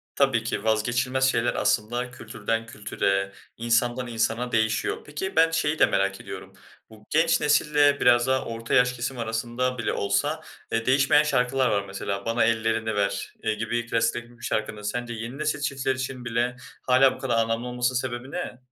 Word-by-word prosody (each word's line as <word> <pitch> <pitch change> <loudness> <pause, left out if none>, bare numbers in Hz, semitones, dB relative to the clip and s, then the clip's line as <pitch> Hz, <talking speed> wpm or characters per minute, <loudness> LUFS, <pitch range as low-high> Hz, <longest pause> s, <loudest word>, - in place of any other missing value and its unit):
Tabii 135 -5 +2
ki, 115 - -3
vazgeçilmez 120 +4 +1
şeyler 120 -2 +2
aslında 120 +4 0
kültürden 115 -2 -3
kültüre, 100 -3 -1 0.3
insandan 120 +2 +1
insana 115 +1 -1
değişiyor. 110 -1 +1
Peki, 190 +7 -5
ben 165 0 +5
şeyi 160 -1 0
de - - +7
merak 100 0 0
ediyorum, - - -9 0.4
bu 110 -1 -16
genç 165 +2 +3
nesille, 145 -1 +3
biraz 120 0 +4
daha 130 0 +1
orta 115 0 -5
yaş 125 0 +4
kesim 125 +2 -4
arasında 120 +3 -2
bile 115 - -1
olsa, 100 0 0 0.3
eee, 115 0 0
değişmeyen 140 +3 +4
şarkılar 130 -3 +1
var, 100 -2 +1
mesela. 100 0 -4
"Bana 115 0 +2
Ellerini 110 -1 +1
Ver" 100 -1 -1
iii, 110 -1 0
gibi 115 +2 -2
klasikleşmiş 120 +1 -2
şarkının 110 -1 -2
sence 120 +3 -3
yeni 115 +3 -6
nesil 150 0 -1
çiftleri 135 -2 -1
için 130 -1 -5
bile 120 +1 0 0.3
hâlâ 130 +1 +4
bu - - -13
kadar 120 -3 0
anlamlı 115 +1 0
olmasının 125 +1 0
sebebi 130 0 -5
ne? 175 -8 -5
120 Hz, 165 wpm, -25 LUFS, 115-130 Hz, 0.4 s, de